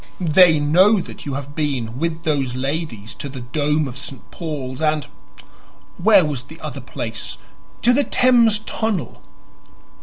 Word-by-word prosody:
They 170 Hz, -3 st, +7 dB
know 185 Hz, +9 st, +4 dB
that 175 Hz, -, -8 dB
you 140 Hz, -, -3 dB
have 140 Hz, +1 st, -6 dB
been 130 Hz, -6 st, -2 dB
with 165 Hz, +1 st, -2 dB
those 140 Hz, -6 st, 0 dB
ladies 130 Hz, -5 st, -3 dB
to 140 Hz, -, -6 dB
the 130 Hz, -2 st, -8 dB
dome 150 Hz, +4 st, 0 dB
of 130 Hz, 0 st, -7 dB
St. 140 Hz, -3 st, -9 dB
Paul's 145 Hz, -5 st, -5 dB
and 155 Hz, -2 st, +1 dB, 0.9 s
where 200 Hz, -1 st, +6 dB
was 135 Hz, -5 st, -3 dB
the 160 Hz, +2 st, -13 dB
other -, -, -6 dB
place? -, -, -5 dB, 0.5 s
to 245 Hz, -, +5 dB
the 285 Hz, +3 st, +3 dB
Thames 240 Hz, -5 st, +4 dB
Tunnel." 220 Hz, -6 st, -3 dB
150 Hz, 150 wpm, -20 LUFS, 135-175 Hz, 0.9 s, They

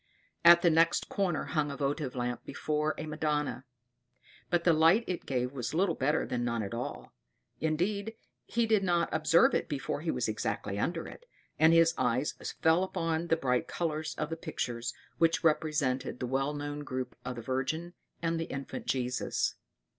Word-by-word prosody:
At 170 Hz, 0 st, +8 dB
the 170 Hz, -, +5 dB
next 165 Hz, +2 st, +3 dB
corner 190 Hz, -5 st, 0 dB
hung 150 Hz, -3 st, -1 dB
a 140 Hz, -, -5 dB
votive 140 Hz, -2 st, -2 dB
lamp 120 Hz, -1 st, -2 dB
before 150 Hz, 0 st, -1 dB
a 155 Hz, -, -4 dB
Madonna, 150 Hz, -5 st, -2 dB, 0.8 s
but 175 Hz, -1 st, +1 dB
the 170 Hz, -, +5 dB
light 165 Hz, +8 st, +5 dB
it 180 Hz, -, -4 dB
gave 125 Hz, -1 st, -1 dB
was 130 Hz, +1 st, -4 dB
little 180 Hz, 0 st, +2 dB
better 150 Hz, +3 st, +1 dB
than 120 Hz, -1 st, -2 dB
none 120 Hz, -2 st, -1 dB
at 100 Hz, -, -5 dB
all; 120 Hz, +1 st, -5 dB, 0.5 s
indeed, 200 Hz, +8 st, -1 dB, 0.3 s
he 235 Hz, 0 st, +1 dB
did 220 Hz, -3 st, +3 dB
not 175 Hz, -2 st, +2 dB
observe 155 Hz, +2 st, +4 dB
it -, -, 0 dB
before 145 Hz, 0 st, -3 dB
he 165 Hz, -, -3 dB
was 125 Hz, -6 st, 0 dB
exactly 105 Hz, -2 st, -2 dB
under 165 Hz, +7 st, -1 dB
it, -, -, -12 dB, 0.3 s
and 160 Hz, +1 st, +7 dB
his 165 Hz, 0 st, +5 dB
eyes 130 Hz, +3 st, +1 dB, 0.3 s
fell 160 Hz, +3 st, +5 dB
upon 165 Hz, -2 st, -1 dB
the 165 Hz, -, +3 dB
bright 125 Hz, -5 st, 0 dB
colors 155 Hz, -2 st, -2 dB
of 150 Hz, +1 st, -3 dB
the -, -, -1 dB
pictures 120 Hz, -5 st, -3 dB, 0.3 s
which 165 Hz, 0 st, +3 dB
represented 150 Hz, -5 st, +1 dB
the -, -, -2 dB
well 135 Hz, +3 st, -1 dB
known 145 Hz, 0 st, -4 dB
group 130 Hz, -3 st, -4 dB
of 125 Hz, 0 st, -4 dB
the 120 Hz, -, -7 dB
Virgin 155 Hz, +7 st, -2 dB, 0.3 s
and 165 Hz, 0 st, 0 dB
the 165 Hz, -, -1 dB
infant 135 Hz, -2 st, -6 dB
Jesus. 125 Hz, -1 st, 0 dB
155 Hz, 175 wpm, -30 LUFS, 130-165 Hz, 0.8 s, At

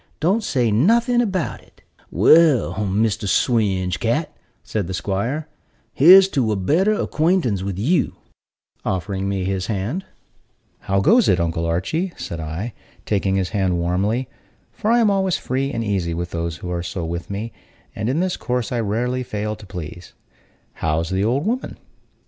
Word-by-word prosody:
Don't 195 Hz, +8 st, +1 dB
say 125 Hz, -, +1 dB
nothing 235 Hz, -, +3 dB
about 190 Hz, -8 st, -2 dB
it." -, -, -25 dB, 0.3 s
"Well, 155 Hz, -7 st, +5 dB
Mr. 105 Hz, +1 st, 0 dB
Swinge 95 Hz, -, +1 dB
cat," -, -, -1 dB, 0.3 s
said 105 Hz, -5 st, -3 dB
the 95 Hz, -, -3 dB
'squire, 105 Hz, -, -2 dB, 0.5 s
"here's 185 Hz, +6 st, +8 dB
to 125 Hz, -, 0 dB
a -, -, +1 dB
better 160 Hz, -, +2 dB
acquaintance 160 Hz, -, +1 dB
with 95 Hz, -1 st, -4 dB
you," 150 Hz, -, +1 dB, 0.7 s
offering 95 Hz, +1 st, -2 dB
me 95 Hz, -1 st, -1 dB
his 95 Hz, 0 st, -2 dB
hand. 110 Hz, -, -2 dB, 0.8 s
"How 95 Hz, 0 st, 0 dB
goes 225 Hz, -, +4 dB
it, 90 Hz, -, +3 dB
Uncle 85 Hz, 0 st, -1 dB
Archy?" 160 Hz, -, -1 dB
said 85 Hz, -, -6 dB
I, 80 Hz, +9 st, -5 dB, 0.3 s
taking 95 Hz, -2 st, 0 dB
his 95 Hz, -2 st, 0 dB
hand 95 Hz, -4 st, 0 dB
warmly 100 Hz, +9 st, 0 dB, 0.4 s
(for 215 Hz, -, -3 dB
I 240 Hz, -, +5 dB
am 225 Hz, -4 st, +4 dB
always 190 Hz, -2 st, +1 dB
free 135 Hz, +2 st, -2 dB
and 115 Hz, -, -2 dB
easy 95 Hz, -6 st, -1 dB
with 85 Hz, +1 st, -4 dB
those 85 Hz, -1 st, -3 dB
who 90 Hz, -, -6 dB
are 85 Hz, -1 st, -2 dB
so 85 Hz, 0 st, -4 dB
with 85 Hz, +1 st, -5 dB
me; 105 Hz, +4 st, -5 dB, 0.4 s
and 110 Hz, -, -2 dB
in 145 Hz, +6 st, +1 dB
this 185 Hz, -1 st, -1 dB
course 125 Hz, -4 st, -2 dB
I 120 Hz, -, 0 dB
rarely 120 Hz, +4 st, -1 dB
fail 105 Hz, -3 st, -3 dB
to 105 Hz, -1 st, -14 dB
please). 85 Hz, -2 st, -8 dB, 0.7 s
"How's 80 Hz, +3 st, 0 dB
the 95 Hz, +1 st, +1 dB
old 125 Hz, +7 st, +1 dB
woman?" 245 Hz, +4 st, -2 dB
105 Hz, 165 wpm, -21 LUFS, 95-150 Hz, 0.8 s, here's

